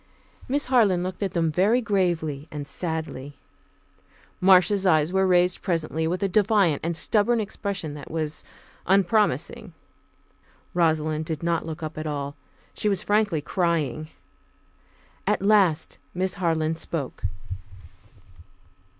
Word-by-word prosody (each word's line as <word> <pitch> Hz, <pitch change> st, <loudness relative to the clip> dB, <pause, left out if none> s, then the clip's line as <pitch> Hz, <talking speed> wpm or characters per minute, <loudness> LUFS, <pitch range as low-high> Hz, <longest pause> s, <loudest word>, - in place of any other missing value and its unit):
Miss 285 Hz, +3 st, 0 dB
Harland 215 Hz, -9 st, +3 dB
looked 185 Hz, +2 st, -5 dB
at 195 Hz, -, -1 dB
them 165 Hz, -2 st, +1 dB
very 200 Hz, +9 st, +3 dB
gravely 175 Hz, -, -1 dB
and 145 Hz, -1 st, -6 dB
sadly. 160 Hz, -5 st, -4 dB, 1.0 s
Marcia's 190 Hz, +1 st, +5 dB
eyes 160 Hz, -2 st, +3 dB
were 190 Hz, 0 st, +3 dB
raised 180 Hz, 0 st, +3 dB
presently 160 Hz, -3 st, -1 dB
with 180 Hz, +4 st, -2 dB
a -, -, +3 dB
defiant 200 Hz, -5 st, +3 dB
and 170 Hz, 0 st, -2 dB
stubborn 225 Hz, +6 st, +2 dB
expression 200 Hz, -6 st, -4 dB
that 145 Hz, -1 st, -9 dB
was 155 Hz, -1 st, -3 dB, 0.4 s
unpromising. 195 Hz, -, +1 dB, 1.0 s
Rosalind 155 Hz, -2 st, +1 dB
did 160 Hz, 0 st, -4 dB
not 170 Hz, -1 st, 0 dB
look 160 Hz, +1 st, -6 dB
up 155 Hz, 0 st, -5 dB
at 155 Hz, -, -4 dB
all. 145 Hz, -1 st, -4 dB, 0.4 s
She 210 Hz, -, 0 dB
was 195 Hz, -3 st, +1 dB
frankly 205 Hz, -6 st, +1 dB
crying. 155 Hz, -4 st, -1 dB, 1.2 s
At -, -, +1 dB
last 195 Hz, -6 st, +3 dB, 0.2 s
Miss 185 Hz, +1 st, 0 dB
Harland 160 Hz, -2 st, 0 dB
spoke. 145 Hz, -12 st, -5 dB
175 Hz, 125 wpm, -25 LUFS, 155-195 Hz, 1.2 s, Marcia's